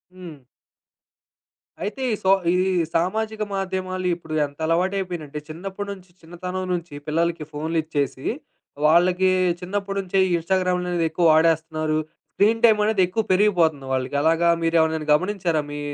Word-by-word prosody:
హ్మ్. 175 -5 -10 1.5
అయితే 210 +6 -4
ఈ - - +1
సో 190 - +1 0.2
ఈ - - +2 0.2
ఈ 170 -2 +1
సామాజిక 215 +6 -1
మాధ్యమాలు 185 -1 -3
ఇప్పుడు 160 -2 -9
ఎంత 145 +1 -12
అలవాటయిపోయినయంటే, 175 -3 -1
చిన్నప్పడినుంచి 190 +2 -7
చిన్నతనం 180 +3 -6
నుంచి 170 -3 -4
పిల్లలకి 165 +1 0
ఫోనులిచ్చేసి, 155 -3 -2 0.6
వాళ్ళకి 180 +4 +4 0.3
చిన్నప్పటి 195 +2 -3
నుంచే 190 0 -1 0.2
ఇన్‌స్టాగ్రాములనేవి 180 -1 0
ఎక్కువ 170 +2 0
వాడేస్తన్నారు. 155 -1 +1 0.3
స్క్రీన్‌టైమ్ 220 +1 +4
అనేది 215 -2 +2
ఎక్కువ 220 +5 -1
పెరిగిపోతుంది 175 -8 +2
వాళ్ళకి. 130 +1 -2
అలాగా 165 +1 +3
మీరెవరినైనా 160 -1 +1
గమనించారా? 175 -1 0
మీ 145 - -5
175 Hz, 115 wpm, -23 LUFS, 160-190 Hz, 1.5 s, వాళ్ళకి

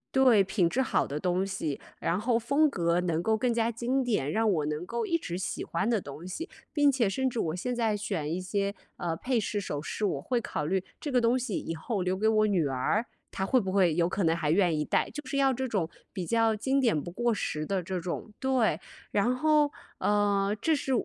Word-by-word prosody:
对， 255 -6 +6
品 190 -2 +1
质 245 - -1
好 - - +1
的 145 +2 -3
东 180 +3 +1
西， 185 -7 -3 0.2
然 175 - 0
后 230 +2 +2
风 280 +7 +3
格 170 -6 +1
能 170 -2 -1
够 220 +2 +2
更 240 +3 +1
加 230 0 +1
经 250 +4 0
典， 205 - 0
让 225 +3 +1
我 155 -5 0
能 155 +3 -3
够 235 +2 -3
一 335 - +2
直 180 - -5
喜 180 - -3
欢 190 +7 -1
的 225 -3 +2
东 150 +3 -9
西， 325 - -5 0.2
并 290 -2 +4
且 240 -7 +1
甚 265 +6 0
至 240 -2 -2
我 160 -4 -1
现 245 +7 -2
在 225 -3 +1
选 160 -7 -3
一 175 - -1
些， 200 +2 -1 0.2
呃， 170 -2 -2
配 250 +2 0
饰、 205 0 -2
首 145 -6 -4
饰， 210 - -3
我 145 -8 -1
会 245 - 0
考 150 -9 -3
虑 190 +1 0 0.2
这 290 - -4
个 255 - +4
东 240 +2 +3
西 230 -6 -2
以 165 - -4
后 185 +5 -2
留 185 +1 0
给 215 +3 +1
我 215 -1 +4
女 180 -8 +2
儿， 135 - 0 0.3
她 190 - -3
会 255 +6 +3
不 190 -3 -2
会 185 -5 +3
有 170 -1 +3
可 190 +2 -1
能 165 0 +3
还 155 -3 0
愿 175 -3 +3
意 150 - 0
戴， - - +1
就 295 -2 -7
是 275 - -3
要 270 -1 +4
这 260 +1 -2
种 190 -8 -1 0.2
比 180 -3 -4
较 225 -1 +3
经 265 +6 +1
典 225 - +2
不 175 - -7
过 240 +6 0
时 155 -7 -2
的 190 +2 -1
这 185 +1 -3
种 180 +4 -5
对， 260 -4 +2 0.3
然 240 +5 +1
后， 300 0 +3 0.3
呃， 205 -1 +2
这 320 - +3
是 280 -2 -3
205 Hz, 255 characters per minute, -29 LUFS, 175-240 Hz, 0.3 s, 对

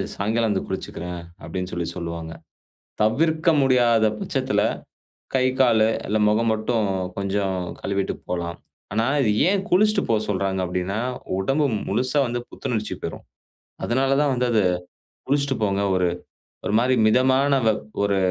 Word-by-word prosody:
சாயங்காலம் 110 +2 0
வந்து 95 - -1
குளிச்சிக்கிறேன்” 90 -2 -5 0.2
அப்படின்னு 90 0 -4
சொல்லி 85 -1 -2
சொல்லுவாங்க. 85 -2 -5 0.7
தவிர்க்க 155 +9 +2
முடியாத 120 -4 +4
பச்சத்தில - - 0 0.7
கை, 130 -1 +3
காலு 115 -4 +5 0.2
இல்லை 110 +1 0
முகம் 115 +2 +2
மட்டும் 110 -1 0 0.3
கொஞ்சம் 100 -1 -1 0.2
கழுவிட்டு 100 0 -1
போலாம். 85 -1 -3 0.4
ஆனா, 110 +2 +1 0.2
இது 110 - +2 0.2
ஏன் 195 -1 +1
குளிச்சிட்டு 210 +4 +4
போ 115 - +3
சொல்றாங்க 95 -1 0
அப்படின்னா, 90 +3 -2 0.4
உடம்பு 135 +10 +1 0.2
முழுசா 130 +7 +1
வந்து 120 0 -2
புத்துணர்ச்சி 110 -3 -3
பெறும். - - -5 0.6
அதனால 135 +3 +2
தான் 145 -2 +2
வந்து 125 0 0
அது 110 - +4 0.7
குளிச்சிட்டு 140 -1 +1
போங்க. 100 -1 0
ஒரு 90 -1 +2 0.6
ஒரு - - -1
மாரி 125 +2 +2
மிதமான 130 +4 +3
வெப் 110 -1 +1 0.2
ஒரு 100 -1 +2
110 Hz, 135 wpm, -23 LUFS, 95-130 Hz, 0.7 s, காலு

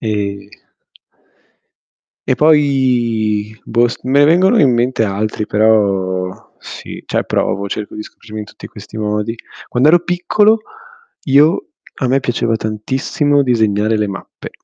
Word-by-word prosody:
E 100 -2 -3 1.8
E 130 - +2
poi 120 -8 +1
boh 120 +1 +2
s - - -6
me 130 +2 +1
ne - - +6
vengono 185 +8 +4
in 135 -4 +4
mente 120 0 +1
altri 105 +1 -2
però 100 -4 +1 0.3
sì, - - -10
cioè - - -1
provo, 100 +2 -1
cerco 105 +1 -5
di 105 - -6
scoprirmi 110 0 -10
in - - -6
tutti - - -12
questi 110 - -11
modi. 105 +1 -2 0.3
Quando 125 +4 +2
ero 175 +2 +5
piccolo, 205 +5 +2 0.7
io 145 +5 +3 0.3
a 130 - -2
me 135 +2 +2
piaceva 120 -3 -1
tantissimo 130 +7 -1
disegnare 110 -4 +1
le 105 0 0
mappe, 95 0 -9
115 Hz, 135 wpm, -16 LUFS, 105-135 Hz, 1.8 s, ne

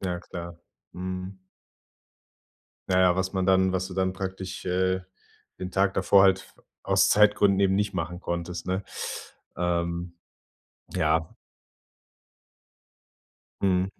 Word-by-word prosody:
Ja, 90 -2 -3
klar. 85 -1 -8 0.4
Mhm. 95 +1 -5 1.5
Na 95 0 +3
ja, 90 -1 +4
was 95 0 -1
man 95 -1 0
dann 95 0 +4
was 95 0 -1
du 90 - -8
dann 95 0 +1
praktisch, 95 0 -6
äh, 95 +1 +1 0.6
den 90 0 -5
Tag 95 +1 +1
davor 100 -1 +5
halt 95 0 +4
f - - -17 0.3
aus - - +3
Zeitgründen 105 -1 +4
eben 95 -1 +3
nicht 105 -1 0
machen 90 0 -3
konntest, 85 0 -4
ne? 95 +2 -1 0.7
Ähm, 85 0 -1 0.8
ja. 80 -2 +1 2.3
Mhm. 95 -1 +3
95 Hz, 120 wpm, -26 LUFS, 90-95 Hz, 2.3 s, davor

